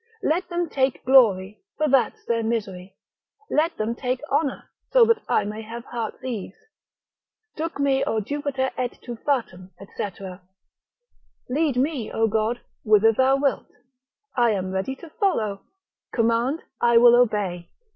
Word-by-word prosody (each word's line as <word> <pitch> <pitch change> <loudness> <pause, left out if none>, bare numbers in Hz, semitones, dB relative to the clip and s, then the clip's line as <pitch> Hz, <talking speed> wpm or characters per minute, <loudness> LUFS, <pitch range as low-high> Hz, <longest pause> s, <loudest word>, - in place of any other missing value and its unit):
Let 340 +5 0
them 345 -1 -1
take 265 -3 -1
glory, 210 -7 +4 0.2
for 305 - +1
that's 270 -3 +1
their 230 -1 0
misery; 200 -5 -3 0.6
let 320 +3 +1
them 215 +2 -1
take 250 +1 -2
honour, 285 -4 0 0.3
so - - +7
that 455 -1 +2
I - - +3
may 210 +1 -5
have 230 +2 -8
heart's 235 0 -5
ease. 235 -7 -5 1.0
Duc 325 0 -4
me 275 -1 +2
O 220 - 0
Jupiter 270 +2 -2
et 250 -1 -2
tu 240 - -6
fatum, 225 -8 -2 0.3
&c. - - -2 1.4
Lead 285 0 0
me, 265 -4 -1
O 225 - +1
God, 220 +2 -1 0.2
whither 215 0 +5
thou 260 +4 +3
wilt, 275 0 0 0.7
I 240 -2 +3
am 185 -2 -3
ready 190 +8 -2
to 330 +4 -13
follow; 220 - 0 0.5
command, 235 +6 +1 0.2
I 235 -1 +5
will 240 0 +8
obey. 205 -8 +1
240 Hz, 145 wpm, -24 LUFS, 215-275 Hz, 1.4 s, will